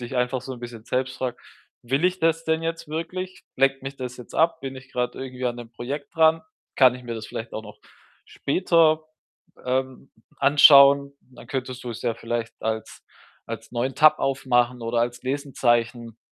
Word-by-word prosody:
dich 120 Hz, +2 st, -7 dB
einfach 125 Hz, +1 st, 0 dB
so 130 Hz, -, -6 dB
'n 120 Hz, -, -13 dB
bisschen 120 Hz, -2 st, -9 dB
selbst 130 Hz, +1 st, -2 dB
fragst: 125 Hz, -2 st, -4 dB, 0.4 s
„Will 135 Hz, +7 st, 0 dB
ich 185 Hz, 0 st, +1 dB
das 165 Hz, 0 st, +1 dB
denn 160 Hz, 0 st, 0 dB
jetzt 165 Hz, 0 st, -3 dB
wirklich? 185 Hz, +4 st, -5 dB
Lenkt 135 Hz, 0 st, +2 dB
mich 135 Hz, 0 st, -6 dB
das 125 Hz, -1 st, -6 dB
jetzt 125 Hz, -, -12 dB
ab? 165 Hz, 0 st, +2 dB
Bin 135 Hz, -1 st, -6 dB
ich 130 Hz, 0 st, -13 dB
grad 125 Hz, 0 st, -1 dB
irgendwie 130 Hz, -1 st, -6 dB
an 120 Hz, 0 st, -2 dB
'nem 120 Hz, -1 st, -10 dB
Projekt 140 Hz, +6 st, -6 dB
dran? 160 Hz, 0 st, +4 dB, 0.3 s
Kann 130 Hz, -2 st, +6 dB
ich 125 Hz, -, -10 dB
mir 120 Hz, -, -5 dB
das 110 Hz, -1 st, -6 dB
vielleicht 115 Hz, +1 st, -7 dB
auch 110 Hz, -, -4 dB
noch 105 Hz, 0 st, -13 dB, 0.5 s
später, 160 Hz, 0 st, +2 dB, 0.6 s
ähm, 130 Hz, +1 st, -2 dB, 0.3 s
anschauen?“ 140 Hz, 0 st, +7 dB
Dann 125 Hz, -2 st, -16 dB
könntest 130 Hz, -1 st, -4 dB
du 120 Hz, -, -3 dB
es 110 Hz, -, -8 dB
ja 120 Hz, -2 st, +1 dB
vielleicht 115 Hz, 0 st, -4 dB
als 110 Hz, 0 st, -4 dB, 0.5 s
als -, -, -7 dB
neuen 125 Hz, +2 st, -1 dB
Tab 155 Hz, 0 st, +6 dB
aufmachen 125 Hz, -2 st, +1 dB
oder 115 Hz, +1 st, -2 dB
als 120 Hz, +1 st, -1 dB
Lesezeichen 120 Hz, -4 st, -1 dB
130 Hz, 185 wpm, -24 LUFS, 120-140 Hz, 0.6 s, anschauen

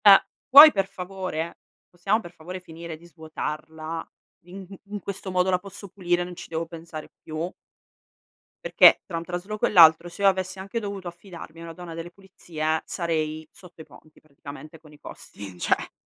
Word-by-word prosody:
Uh, 195 Hz, -1 st, +11 dB, 0.3 s
puoi 290 Hz, +4 st, +11 dB
per 195 Hz, -5 st, 0 dB
favore? 185 Hz, -3 st, -5 dB, 0.3 s
Possiamo 195 Hz, +5 st, 0 dB
per 175 Hz, -6 st, -11 dB
favore 175 Hz, +2 st, -8 dB
finire 165 Hz, -2 st, -9 dB
di 170 Hz, -, -18 dB
svuotarla? 160 Hz, 0 st, -6 dB, 0.4 s
In 190 Hz, +2 st, -10 dB, 0.2 s
in 205 Hz, +1 st, -6 dB
questo 195 Hz, 0 st, -5 dB
modo 180 Hz, 0 st, +1 dB
la 180 Hz, -, +2 dB
posso 200 Hz, +1 st, -11 dB
pulire, 175 Hz, -2 st, 0 dB
non 175 Hz, 0 st, -8 dB
ci -, -, -9 dB
devo 165 Hz, 0 st, -2 dB
pensare 165 Hz, -2 st, -9 dB
più? 160 Hz, +3 st, -5 dB, 1.1 s
Perché -, -, +7 dB
tra 170 Hz, -, -4 dB
un 165 Hz, -, -4 dB
trasloco 180 Hz, +5 st, -3 dB
e -, -, 0 dB
l'altro 165 Hz, -2 st, +7 dB
se 175 Hz, +3 st, -10 dB
io 200 Hz, -, +5 dB
avessi 190 Hz, 0 st, 0 dB
anche 195 Hz, +4 st, -4 dB
dovuto 200 Hz, -4 st, -6 dB
affidarmi 175 Hz, -2 st, -10 dB
a -, -, -8 dB
una 165 Hz, 0 st, -8 dB
donna 170 Hz, -1 st, -9 dB
delle 165 Hz, +1 st, -7 dB
pulizie 160 Hz, -5 st, -4 dB
sarei 155 Hz, -2 st, -2 dB
sotto 180 Hz, -3 st, -14 dB
i -, -, -11 dB
ponti 155 Hz, +2 st, -19 dB
praticamente 150 Hz, +1 st, -12 dB
con 155 Hz, -1 st, -18 dB
i 150 Hz, -, -18 dB
costi, 100 Hz, -9 st, -10 dB
cioè. -, -, 0 dB
175 Hz, 180 wpm, -25 LUFS, 160-190 Hz, 1.1 s, Uh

